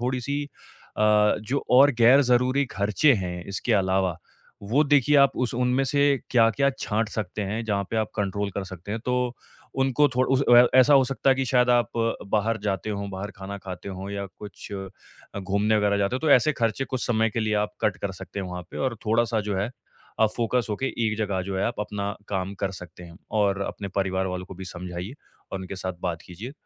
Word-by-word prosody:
थोड़ी-सी 130 +3 -2 0.5
अ, - - +2 0.4
जो 125 +7 -2
और 135 +3 +7
गैर 125 +4 +7
ज़रूरी 125 +3 +3
खर्चे 105 +9 +3
हैं, 90 -4 -4
इसके 100 +4 -2
अलावा, 95 -3 +1 0.5
वो 120 +9 +2
देखिए 145 0 +4
आप 140 -1 +6
उस 120 - -3
उनमें 125 +2 +1
से 140 +2 0 0.3
क्या-क्या 120 +3 +3
छाँट 110 0 -1
सकते 105 -1 -4
हैं, 110 +3 -2
जहाँ 100 -2 -1
पे 115 - -2
आप 110 -1 0
कंट्रोल 100 0 -1
कर 100 - -2
सकते 95 +2 -7
हैं, 110 - -3
तो 125 - 0 0.7
उनको 145 +3 +3
थोड़ 130 +1 +2
उस 135 +1 +2
अ 120 - +3
अ, 120 +1 +8
ऐसा 140 +3 +7
हो 135 -1 +6
सकता 135 +1 +2
है 130 - +4
कि 135 - 0
शायद 125 -1 +4
आप 120 -3 +3 0.4
बाहर 110 +2 +1
जाते 95 +1 -2
हों, 100 -1 -4
बाहर 95 +2 -5
खाना 100 +1 -7
खाते 95 -1 -8
हों 95 +1 -6
या 100 0 -4
कुछ 105 -1 -10
अ, 95 0 -10
घूमने 100 +3 +1
वगैरह 105 -1 +2
जाते 100 +5 0
हों, - - -6
तो 160 - +1
ऐसे 155 +5 +1
खर्चे 115 +4 0
कुछ 130 -2 -3
समय 115 -1 +2
के 115 - -2
लिए 110 -1 0
आप - - -10
कट 100 -3 +1
कर 100 -1 -2
सकते 100 - -6
हो 95 - -5
वहाँ 90 0 -5
पे - - -9
और 115 - -8
थोड़ा-सा 115 0 +2
जो 100 - -1
है 100 +5 -1 0.5
आप 110 - +5
फ़ोकस 120 0 0
होके 120 +6 -2 0.2
एक 110 0 -1
जगह 100 -3 -1
जो 95 +1 -4
है - - 0
आप 115 - -3
अपना 100 -1 -3
काम 95 0 -3
कर 95 - +1
सकते 90 0 -12
हैं 85 -1 -13 0.2
और 100 -1 +1
अपने 100 - -5
परिवार 95 0 -1
वालों 90 0 -4
को 95 - -10
भी 95 +1 -8
समझाइए 90 +4 -6 0.4
और 95 - -2
उनके 95 +1 -7
साथ 95 0 -3
बात 85 -3 -3
कीजिए, 105 +9 -9
105 Hz, 220 wpm, -25 LUFS, 95-125 Hz, 0.7 s, अ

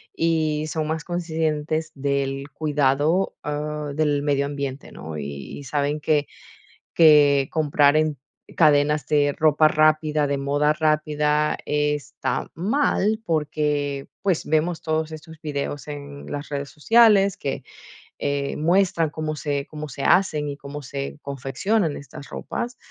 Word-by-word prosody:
y 155 -2 0
son 155 0 -2
más 160 0 -2
conscientes 160 -2 -2
del 140 0 -2
cuidado, 150 +4 +1
ah, 150 0 -3
del 145 -2 +1
medio 140 -1 +1
ambiente, 140 -1 -5
¿no? 80 0 -7
Y 70 -2 -6
y - - -9
saben 145 +2 -1
que 150 -1 +1 0.7
que 145 -4 +6
comprar 150 -2 +3
en 155 -1 +1 0.4
cadenas 150 -1 +4
de 145 -1 +2
ropa 155 0 +5
rápida, 155 -1 +2
de 140 0 0
moda 145 +2 +1
rápida 150 -1 +1
está 150 -2 -1
mal, 215 - +1
porque, 150 -4 -1
pues, 190 -5 +1
vemos 160 +2 0
todos 160 0 -1
estos 155 0 -10
videos 145 -2 -4
en 145 -1 -8
las 145 0 -5
redes 140 -1 -4
sociales 200 +3 +4
que, 135 -1 -4 0.6
eh, 140 -1 -1
muestran 170 0 +2
cómo 155 0 -4
se 145 0 -3
cómo 150 -1 -7
se 140 +2 -6
hacen, 155 -6 +3
y 140 - -4
cómo 140 +1 -8
se 140 +1 -6
confeccionan 140 - -1
estas 140 0 -11
ropas. 245 +1 -5
150 Hz, 135 wpm, -23 LUFS, 140-155 Hz, 0.7 s, que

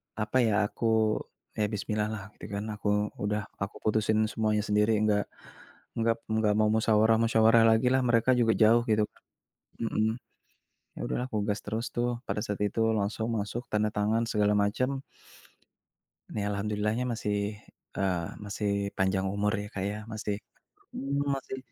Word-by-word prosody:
apa 110 +3 -1
ya, 115 -4 +3
aku 115 - -5 0.7
ya 105 - +2
bismillah-lah 105 0 -3
gitu - - -8
kan. 100 - -2
Aku 105 0 0
udah 105 +1 -1 0.2
aku 100 0 -4
putusin 110 0 +2
semuanya 105 -1 +1
sendiri 105 +1 +3
enggak 105 -1 +2 0.7
enggak 115 0 +2
enggak 110 -1 +2
mau 110 - +4
musyawarah-musyawarah 110 +1 +4
lagilah. 125 +3 +3
Mereka 120 +1 +3
juga 115 -2 +4
jauh 115 +2 +5
gitu. 105 0 +3 0.8
Mhm. 110 0 0 0.8
Ya - - -8
udahlah 125 - -1
aku 110 - -2
gas 100 0 0
terus 110 +3 -3
tuh 120 0 0 0.2
pada - - -1
saat 105 0 -4
itu 105 +2 -1 0.2
langsung 110 +2 -1
masuk 105 +4 -3
tanda 105 0 +2
tangan 110 +2 +1
segala 105 -2 +2
macam. 125 +7 0 1.3
Ya 100 - -1
alhamdulillah-nya 105 +4 -1
masih, 105 -1 -2 0.4
eee, 90 -4 0 0.2
masih 105 0 -2 0.3
panjang 95 0 +1
umur 105 +1 +1
ya, - - -6
Kak, 95 - -3
ya 105 - -5 0.2
masih 105 -1 -2 0.6
mmm, 140 +1 -1
masih 130 0 -6
110 Hz, 145 wpm, -29 LUFS, 105-115 Hz, 1.3 s, jauh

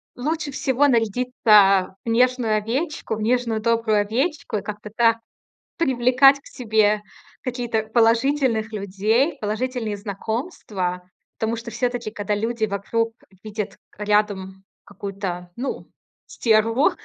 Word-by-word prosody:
лучше 305 +3 -2
всего 275 +1 +2
нарядиться 215 -5 +3
в - - -2
нежную 240 -2 +2
овечку, 255 +5 -2
в 215 - -6
нежную 230 0 +1
добрую 225 -2 +2
овечку 270 +5 -1
и - - -3
как-то 210 0 -7
так 230 -1 +4 0.6
привлекать 265 -1 +4
к - - -31
себе 215 -3 +1 0.4
какие-то, 240 -3 -2
положительных 230 0 +2
людей, 215 - 0
положительные 220 0 -2
знакомства. 200 - -4 0.3
Потому 225 +1 -1
что 230 0 -7
всё-таки, 245 -3 -2
когда 205 -1 -2
люди 225 +1 -1
вокруг 225 +3 -1 0.3
видят 215 -1 -5 0.2
рядом 205 -2 0 0.2
какую-то, 195 -3 -6
ну, 265 +3 -5 0.4
стерву, 225 +4 +2
225 Hz, 115 wpm, -23 LUFS, 210-250 Hz, 0.6 s, так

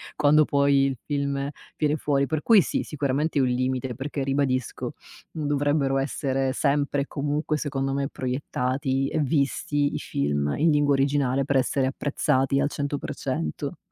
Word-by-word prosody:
quando 150 +1 +5
poi 140 -1 +3
il 135 -3 -3
film 140 -1 -1 0.3
viene 150 0 +1
fuori, 140 -2 +1
per 155 +1 -2
cui 220 0 +6
sì, - - -1
sicuramente 145 +1 -1
è - - +4
un 130 - +3
limite 130 0 -1
perché 140 +1 -4
ribadisco 135 -2 -1 0.4
dovrebbero 145 -2 0
essere 135 -1 -1
sempre 145 0 +1
e 140 - -4
comunque 150 +2 -1
secondo 135 -2 -2
me 140 0 -1
proiettati 130 +1 -1
e 160 - -1
visti 145 0 0
i - - -2
film 70 0 -1
in 160 +2 +3
lingua 145 -1 +3
originale 135 -1 +1
per 140 -1 +2
essere 130 +1 +1
apprezzati 135 -1 0
al 140 +1 +1
100%. 140 - -3
140 Hz, 150 wpm, -25 LUFS, 135-145 Hz, 0.4 s, cui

